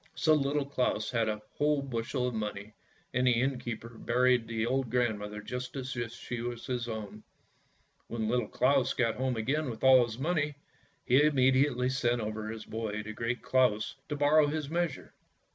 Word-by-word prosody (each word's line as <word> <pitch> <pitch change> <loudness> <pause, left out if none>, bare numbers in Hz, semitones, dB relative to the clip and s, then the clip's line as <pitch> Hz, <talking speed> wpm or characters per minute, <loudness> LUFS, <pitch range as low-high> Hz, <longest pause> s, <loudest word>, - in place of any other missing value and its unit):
So 155 -3 +3
Little 145 -1 +1
Claus 125 -6 -1
had 115 -3 +1
a 105 0 -3 0.2
whole 150 -1 +2
bushel 125 0 -2
of 125 - -3
money, 105 -1 -4 0.4
and 125 +1 +2
the 120 -2 +4
inn 130 0 0
keeper 115 -1 -7
buried 125 0 +2
the 115 -1 -1
old 130 0 0
grandmother 105 -4 -1
just 125 +3 -5
as 130 -1 -4
if 120 -1 -3
she 120 0 -6
had 115 - -4
been 120 -1 -3
his 120 0 -4
own. 110 -2 -6 0.9
When 110 -2 -2
Little 120 -1 +1
Claus 130 +3 +2
got 115 -3 +2
home 130 -2 -1
again 135 +6 0
with 110 -2 -7
all 130 -1 +8
his 115 -1 -5
money, 150 0 0 0.5
he 130 +3 +5
immediately 130 -3 +3
sent 120 -2 +1
over 110 0 -4
his 110 -1 -6
boy 105 -1 -4
to 110 +1 -6
Great 115 +2 -3
Claus 125 -5 +2 0.2
to 150 - -1
borrow 145 +1 +4
his 150 0 -3
measure. 175 0 -2
125 Hz, 185 wpm, -30 LUFS, 115-135 Hz, 0.9 s, all